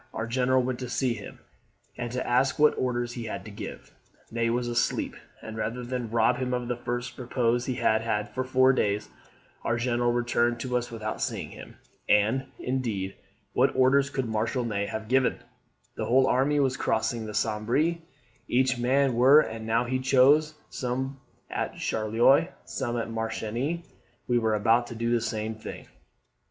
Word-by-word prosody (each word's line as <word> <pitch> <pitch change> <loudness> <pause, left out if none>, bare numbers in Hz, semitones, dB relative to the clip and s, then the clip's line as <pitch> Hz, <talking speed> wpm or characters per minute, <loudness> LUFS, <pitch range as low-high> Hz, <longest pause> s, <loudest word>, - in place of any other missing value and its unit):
Our 115 - -2
general 130 +2 +2
went 125 -1 -2
to 125 -2 -5
see 125 -1 0
him, 105 -3 -9 0.6
and 120 -1 -4
to 125 +1 -3
ask 130 +2 +2
what 150 0 +5
orders 120 -1 -1
he 120 -2 -5
had 110 - -5
to 110 - -8
give. 100 - -8 0.4
Ney 115 0 0
was 120 +1 0
asleep; 120 -1 0 0.3
and, 110 - -7
rather 115 +3 -3
than 120 -1 -3
rob 115 +1 +3
him 125 -1 -1
of 125 -1 -3
the 125 - -1
first 120 +1 -4
repose 120 -1 0
he 130 - -1
had 110 -1 +2
had 105 -2 -2
for 130 - -1
four 130 0 +4
days, 105 -4 0 0.5
our 115 - 0
General 120 0 +1
returned 120 0 +1
to 125 -1 -2
us 120 0 -1
without 110 -2 -5
seeing - - -3
him. - - -11 0.3
And, 110 +6 +3
indeed, 115 -7 -2 0.4
what - - +3
orders 135 +2 +4
could 135 -2 -2
Marshal 110 +3 -1
Ney 100 -3 -1
have 110 -1 -5
given? 130 +1 +2 0.6
The 110 - -3
whole 130 +4 +4
army 140 +3 +2
was 130 -2 +1
crossing 110 0 -1
the 105 - -6
Sambre, 115 +11 +1 0.5
each 125 0 +2
man 130 +2 +2
where 130 +5 +7
and 110 -4 -5
now 115 +2 +2
he 130 +2 -1
chose; 140 +4 +4 0.2
some 130 +1 -3 0.3
at - - -3
Charleroi, 115 +8 +3 0.2
some 120 -3 -3
at 115 - -2
Marchiennes. 115 +8 -3 0.4
We 120 -1 +3
were 110 -2 +1
about 115 +3 +3
to 120 - -8
do 115 +1 -1
the 120 -1 +2
same 110 0 -2
thing. 110 - -9
120 Hz, 175 wpm, -27 LUFS, 115-130 Hz, 0.6 s, where